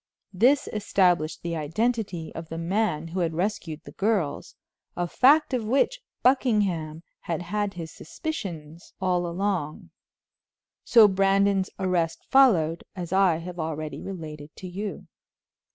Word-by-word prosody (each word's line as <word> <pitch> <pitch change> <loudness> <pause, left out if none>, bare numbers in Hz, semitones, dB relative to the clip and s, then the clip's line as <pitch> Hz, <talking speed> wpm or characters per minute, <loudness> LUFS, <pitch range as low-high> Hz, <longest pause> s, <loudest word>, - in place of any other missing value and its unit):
This 255 +9 +3
established 180 -6 +1
the 170 -1 -2
identity 180 +2 -2
of 165 0 -8
the 165 - -5
man 170 -2 -1
who 180 +3 -3
had 165 -2 0
rescued 175 -4 -3
the - - -11
girls, 195 -9 -1 0.4
a 175 0 0
fact 285 - +4
of 245 -3 0
which 270 - +1 0.2
Buckingham 200 - +1 0.2
had 170 0 -4
had 205 +2 -2
his 165 -2 -6
suspicions 170 - -7
all 180 -2 0
along. 175 -4 -3 0.9
So 225 -3 +7
Brandon's 195 0 +2
arrest 175 -4 -1
followed, 180 -12 +4
as 175 -1 -5
I 190 -3 +4
have 175 +1 -8
already 155 -1 -4
related 155 -6 -7
to 185 - -8
you. 200 +3 -5
180 Hz, 130 wpm, -26 LUFS, 165-210 Hz, 0.9 s, So